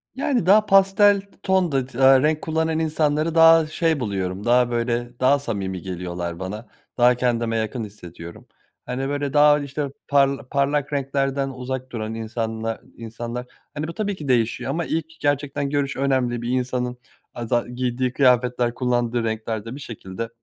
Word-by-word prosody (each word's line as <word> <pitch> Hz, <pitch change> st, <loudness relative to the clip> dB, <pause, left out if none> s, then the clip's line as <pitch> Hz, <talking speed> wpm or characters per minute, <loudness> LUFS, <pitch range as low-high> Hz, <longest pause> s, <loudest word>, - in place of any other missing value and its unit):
Yani, 260 Hz, -, 0 dB
daha 210 Hz, +3 st, +6 dB
pastel 195 Hz, +1 st, +5 dB
t 200 Hz, -, -23 dB, 0.2 s
tonda 175 Hz, -9 st, +1 dB
tı 125 Hz, -2 st, -12 dB
eee, 135 Hz, 0 st, +6 dB
renk 155 Hz, 0 st, +1 dB
kullanan 160 Hz, 0 st, 0 dB
insanları 155 Hz, 0 st, 0 dB
daha 165 Hz, -1 st, +7 dB
şey 160 Hz, 0 st, 0 dB
buluyorum, 100 Hz, -4 st, -3 dB
daha, 120 Hz, 0 st, +3 dB
böyle, 120 Hz, +1 st, -2 dB
daha 140 Hz, +3 st, +4 dB
samimi 100 Hz, -8 st, -4 dB
geliyorlar 90 Hz, -2 st, -5 dB
bana. 105 Hz, +5 st, -6 dB, 0.3 s
Daha 125 Hz, 0 st, +5 dB
kendime 115 Hz, -2 st, 0 dB
yakın 110 Hz, +2 st, -2 dB
hissediyorum, 85 Hz, -4 st, -11 dB, 0.4 s
hani, 135 Hz, +2 st, -3 dB
böyle, 145 Hz, -1 st, -2 dB
daha, 150 Hz, 0 st, +6 dB
işte, 145 Hz, +1 st, -3 dB, 0.2 s
parla 140 Hz, -2 st, +2 dB
parlak 145 Hz, +1 st, 0 dB
renklerden 135 Hz, 0 st, -1 dB
uzak 130 Hz, 0 st, -5 dB
duran 110 Hz, -2 st, -4 dB
insanla 115 Hz, 0 st, -4 dB, 0.2 s
insanlar, 115 Hz, +2 st, -6 dB, 0.3 s
hani, 150 Hz, +1 st, -4 dB
bu 165 Hz, -, -6 dB
tabii 205 Hz, +2 st, -2 dB
ki 150 Hz, -5 st, -8 dB
değişiyor 120 Hz, -3 st, +1 dB
ama 170 Hz, 0 st, -2 dB
ilk 160 Hz, -1 st, -1 dB
gerçekten 145 Hz, -1 st, -1 dB
görüş 140 Hz, -1 st, -1 dB
önemli. 130 Hz, -3 st, 0 dB
Bir 120 Hz, -, -4 dB
insanın 125 Hz, -1 st, -1 dB, 0.4 s
aza 120 Hz, 0 st, -1 dB
giydiği 125 Hz, 0 st, -2 dB
kıyafetler, 125 Hz, -2 st, +2 dB
kullandığı 120 Hz, -1 st, 0 dB
renkler 110 Hz, -1 st, -3 dB
de 115 Hz, +3 st, -6 dB
bir -, -, -8 dB
şekilde 115 Hz, -3 st, -7 dB
130 Hz, 160 wpm, -23 LUFS, 115-145 Hz, 0.4 s, daha